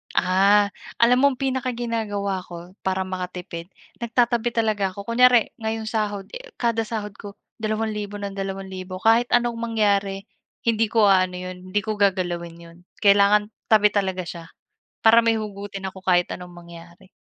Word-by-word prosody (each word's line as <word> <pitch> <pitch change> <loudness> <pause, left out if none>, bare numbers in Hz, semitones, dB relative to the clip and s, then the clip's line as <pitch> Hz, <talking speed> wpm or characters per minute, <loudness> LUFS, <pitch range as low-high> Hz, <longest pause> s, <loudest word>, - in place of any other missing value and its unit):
Ah. 200 +3 +4 0.3
Alam 245 +2 +5
mo 275 - +4
ang - - -32
pinaka 260 -1 -1
ginagawa 210 -5 -2
ko 175 +1 -10
para 190 0 -1
makatipid, 180 -2 -6 0.3
nagtatabi 235 0 +1
talaga 210 -4 0
ako, 200 - -7
kunyari 240 +1 +4
ngayong 220 0 -3
sahod, 210 -3 -2
eh, - - -10
kada 230 -2 0
sahod 210 -2 -4
ko, 200 -1 -9 0.2
2,000 215 -1 -2
nang 200 -1 -5
2,000, 190 -1 -5
kahit 230 +2 +4
anong 240 -1 0
mangyari 200 -4 0 0.4
hindi 225 -1 +2
ko 220 -1 +3
aano 185 -1 +3
'yon, 185 0 -6
hindi 205 - +2
ko 215 -1 -4
gagalawin 175 -4 0
'yon, 170 0 -14 0.3
kailangan 205 +1 +5 0.2
tabi 215 -1 +6
talaga 190 -2 -1
siya, 170 -1 -8 0.6
para 230 +1 +6
may 225 -1 +2
hugutin 200 -2 -6
ako 190 0 -12
kahit 180 -1 +3
anong 180 0 -11
mangyari. 170 +1 -14
205 Hz, 155 wpm, -23 LUFS, 185-225 Hz, 0.6 s, tabi